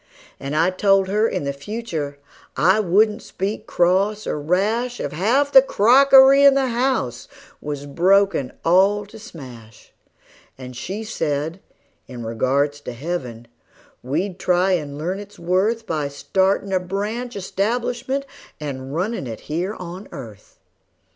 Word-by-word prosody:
And 140 +2 -4
I 165 +4 +3
told 195 0 +2
her 210 +3 +2
in - - -3
the 140 0 -2
future 155 -3 -5 0.4
I 185 +8 +4
wouldn't 210 +3 +2
speak 195 +3 -5
cross 195 +5 +1
or 150 - -3
rash 215 +10 0
If - - -3
half 240 - +1
the 265 - +9
crockery 270 +3 +6
in 280 -1 +7
the 270 -2 +1
house 245 - -1 0.3
was 145 -1 -5
broken 180 -2 +2
all 195 +4 +3
to 220 +2 -13
smash; 125 - -13 0.6
And 125 -1 -9
she 195 - -5
said, 160 -5 -3 0.5
in 120 -3 -8
regards 140 +6 0
to 125 - -7
heaven, 125 -5 -5 0.5
we'd 175 +9 -3
try 180 +1 +2
and 150 -6 -2
learn 180 +6 -3
its 205 0 -11
worth 195 +7 0
By 155 -6 -2
startin' 190 +7 0
a 185 - +3
branch 210 +7 -4
establishment 240 +7 -2 0.3
and 135 -2 -6
runnin' 185 - -2
it 115 -2 -7
here 175 +7 -3
on 180 +2 -8
earth. 110 -6 -11
185 Hz, 140 wpm, -21 LUFS, 145-215 Hz, 0.6 s, the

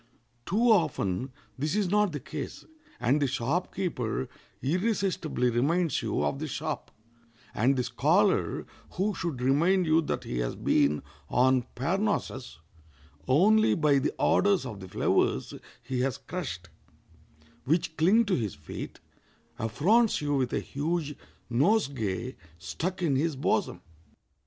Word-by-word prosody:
Too 230 +4 +3
often 130 - +1 0.3
this 150 +6 -1
is 210 -3 +1
not 210 +1 +2
the 145 - -4
case, - - -7 0.3
and 140 +5 +2
the 140 - +3
shop 140 +8 -1
keeper 125 - -2 0.3
irresistibly 180 - 0
reminds 150 +6 +1
you - - -1
of 135 - -1
the 155 - -3
shop, 155 +1 -4 0.6
and 130 +5 +2
the 125 - 0
scholar, 160 +11 +2 0.3
who 200 +4 0
should 165 -8 -3
remind 170 +8 +3
you 160 +1 +4
that 155 - -3
he - - -4
has - - -2
been 75 +1 +2 0.3
on 130 -1 +3
Parnassus 170 - -1 0.7
only 215 +10 +4
by 150 -4 +3
the 135 - 0
odors 200 -7 +3
of 110 -6 -6
the 95 - -9
flowers 65 - +1 0.3
he 130 -1 -3
has 130 -1 0
crushed, 110 - -6 1.0
which 160 +2 0
cling 200 +9 +4
to 200 - 0
his 110 -7 -2
feet, 75 0 -8 0.6
affronts 190 - +2
you 145 -1 -1
with 130 -3 +1
a - - 0
huge 150 +1 -2 0.3
nosegay 130 - 0 0.2
stuck 175 - -4
in 150 -5 +2
his 155 +2 0
bosom. 135 - 0
150 Hz, 135 wpm, -28 LUFS, 125-180 Hz, 1.0 s, you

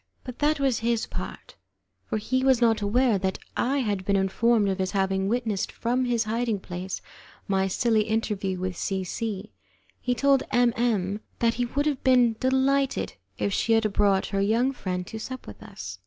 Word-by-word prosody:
But 250 -2 -8
that 300 0 +2
was 265 -5 +1
his 230 0 0
part, - - -7 0.5
for - - -1
he 255 +5 0
was 265 -2 +4
not 225 -3 +3
aware 220 +1 +2
that 190 0 -1 0.2
I 275 +3 +1
had 205 -5 -1
been 200 +1 +1
informed 205 +3 +2
of 190 0 -2
his 190 +1 -1
having 190 -1 +1
witnessed 220 -3 -1
from 250 +2 0
his 240 -2 +1
hiding 225 -1 -1
place 180 0 -6 0.4
my 195 -1 +1
silly 225 +3 +2
interview 210 -4 -1
with 185 0 -3
C 190 +2 -2
C. 200 - -4 0.5
He 250 - -1
told 275 +2 +3
M 245 -1 +3
M 210 -4 0 0.2
that 230 -1 +2
he 245 0 -1
would 285 +4 -1
have 290 -4 -1
been 250 -3 +4
delighted 265 +1 +1 0.2
if 200 - -1
she 230 - +2
had 220 -2 +2
brought 200 -2 +3
her 195 - +2
young 230 +6 +2
friend 180 -8 -4
to 220 - -7
sup 260 +3 -7
with - - -11
us. 200 - -8
225 Hz, 185 wpm, -26 LUFS, 195-245 Hz, 0.5 s, was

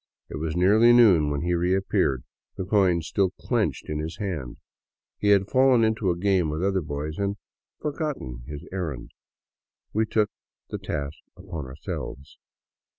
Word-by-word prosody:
It - - -4
was 80 +1 -3
nearly 105 +7 +6
noon 95 -11 +6
when 70 -1 -1
he 90 0 +1
reappeared, 85 -7 +1 0.3
the 95 - -3
coin 95 -4 +3
still 95 +4 +1
in 90 - -2
his - - -18
clenched - - 0 0.3
hand. 85 - -4 0.6
He 105 - 0
had 100 -1 +5
fallen 130 -1 +4
into 110 -3 +1
a 85 - 0
game 95 -3 +2
with 75 +3 -2
other 95 -1 +1
boys 75 +1 -5
and 100 0 -1 0.2
*' - - -68
forgotten 145 - -3
" - - -18
his 75 -1 -6
errand. 85 -9 -4 0.8
We 110 +1 +1
took 105 -1 +1 0.4
the - - -3
task 70 0 -4 0.2
upon 85 -7 -7
ourselves. 70 +1 -7
90 Hz, 160 wpm, -26 LUFS, 75-100 Hz, 0.8 s, nearly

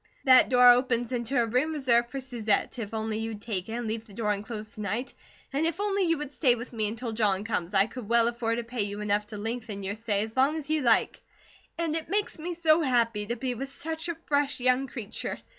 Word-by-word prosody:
That 255 -1 +7
door 250 -1 +6
opens 245 -1 +1
into 245 +1 0
a 235 - +3
room 255 +8 0
reserved 240 -5 +2
for 275 - -5
Susette, 240 -3 -1
if 210 -3 -5
only 220 -1 -2
you'd 225 -1 -4
take 205 -3 -4
it, - - -4
and 240 0 -3
leave 225 +1 -4
the 200 - -14
door 210 -2 0
unclosed 215 +1 -5
to 215 - -8
night, 215 +6 -3 0.4
and 285 +3 +1
if 335 +2 -3
only 405 -1 0
you 330 -1 +2
would 290 -1 -6
stay 255 -6 +4
with 240 +1 -8
me 215 -2 0
until 230 +2 -4
John 205 -3 +1
comes 200 -4 -2
I 195 +1 +5
could 225 -1 -9
well 235 0 +4
afford 235 -1 -1
to 240 - -2
pay 230 0 -3
you 205 0 -2
enough 210 0 0
to 210 0 -7
lengthen 220 -1 -5
your 195 +1 -2
stay 210 -2 -1
as 220 0 -8
long 275 +4 +3
as 305 -1 -5
you'd 310 -4 +1
like; 230 -2 +3 0.6
and 330 -2 -1
it 325 -1 -3
makes 410 -2 -1
me 345 +2 -4
so 325 -1 +4
happy 230 -6 +1
to 235 - -2
be 250 +1 -2
with 270 +3 -5
such 320 +4 -4
a 340 - -2
fresh 290 -4 -1
young 255 +2 +2
creature. 235 -5 -5
235 Hz, 245 wpm, -28 LUFS, 220-270 Hz, 0.6 s, That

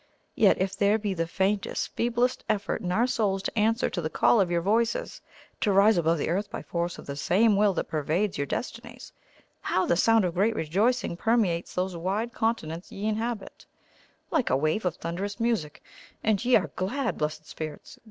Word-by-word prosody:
Yet 205 - +4
if 190 +1 -1
there 205 +1 +3
be 205 -2 -2
the 165 -2 -2
faintest, 190 +3 -1
feeblest 240 +2 0
effort 205 -2 -1
in 180 - -2
our 225 +6 +3
souls 205 -6 0
to - - -4
answer 225 +3 +2
to 175 - -2
the 155 - -2
call 225 - +4
of 185 - +1
your 170 -1 0
voices, 225 +4 0 0.4
to 205 - +1
rise 200 +3 +5
above 165 0 +2
the - - -2
earth 200 +4 -1
by - - -6
force 170 0 -3
of - - -11
the 140 - -5
same 205 +9 +3
will 200 -1 +3
that - - -2
pervades 160 +6 -1
your 140 - -2
destinies, 235 - -6 0.5
how 185 - 0
the - - +2
sound 225 +3 +4
of 175 - -1
great 210 +5 +1
rejoicing 205 +5 0
permeates 195 -5 0
those 185 0 -1
wide 195 +7 -2
continents 175 -7 -2
ye 200 - -5
inhabit, 220 0 -4 0.6
like 305 -7 +1
a 130 - +3
wave 155 +8 0
of 175 -2 0
thunderous 195 +6 -4
music; 225 -11 -1 0.4
and 215 -1 +1
ye 250 0 +4
are - - +1
glad, 235 +7 -2
Blessed 155 0 -3
Spirits! 155 -1 -8
200 Hz, 190 wpm, -27 LUFS, 170-225 Hz, 0.6 s, rise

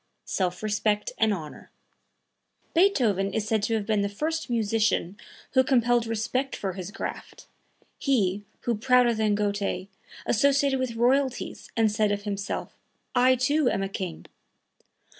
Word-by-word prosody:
SELF 180 0 -2
RESPECT 210 0 0
AND 220 -1 +4
HONOR 160 -7 -6 1.0
Beethoven 240 - +3
is 215 -1 -1
said 220 -1 +1
to 225 +2 0
have 215 -2 -2
been 215 -1 +1
the 200 - 0
first 310 +10 -3
musician 220 -5 +1 0.4
who 260 - +4
compelled 240 -3 +2
respect 235 +4 -1
for 190 -2 -3
his 185 0 -6
craft, 210 - -7 0.5
he 205 -8 +1 0.2
who, 240 - 0
prouder 250 +1 +4
than 215 -2 +1
Goethe, 200 -2 -2 0.4
associated 275 +3 +3
with 255 -3 -2
royalties, 260 +2 0
and 220 -2 +3
said 210 -1 +1
of 205 0 -2
himself, 200 -1 -4 0.4
"I, 255 +1 +5
too, 265 +2 +2
am 195 - -1
a - - -1
king!" 185 -4 -5
220 Hz, 140 wpm, -26 LUFS, 205-255 Hz, 1.0 s, I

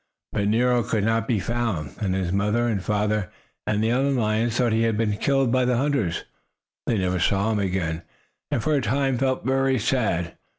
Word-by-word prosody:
But 100 -1 0
Nero 120 +3 +3
could 110 -2 -1
not 115 +1 +1
be 115 -4 +1
found, 110 -9 -2
and 95 -3 0
his 95 -2 -1
father 105 +5 +1
and 105 -5 0
mother 105 -1 0 0.4
and 105 0 +1
the 110 - +2
other 135 +3 +2
lions 115 -2 +1
thought 120 -2 +2
he 110 - +2
had 115 -2 +1
been 105 -2 +1
killed 135 -1 +1
by 130 0 +3
the 125 -1 +2
hunters. 130 - 0 0.6
They 115 - +1
never 90 -1 0
saw 100 +5 +1
him 105 - 0
again, 90 -4 -1 0.5
and, 115 - -1
for 155 - +1
a 140 - +2
time, 130 +2 0
felt 130 -1 0
very 135 0 +2
sad. 105 -8 0
110 Hz, 200 wpm, -24 LUFS, 100-125 Hz, 0.6 s, Nero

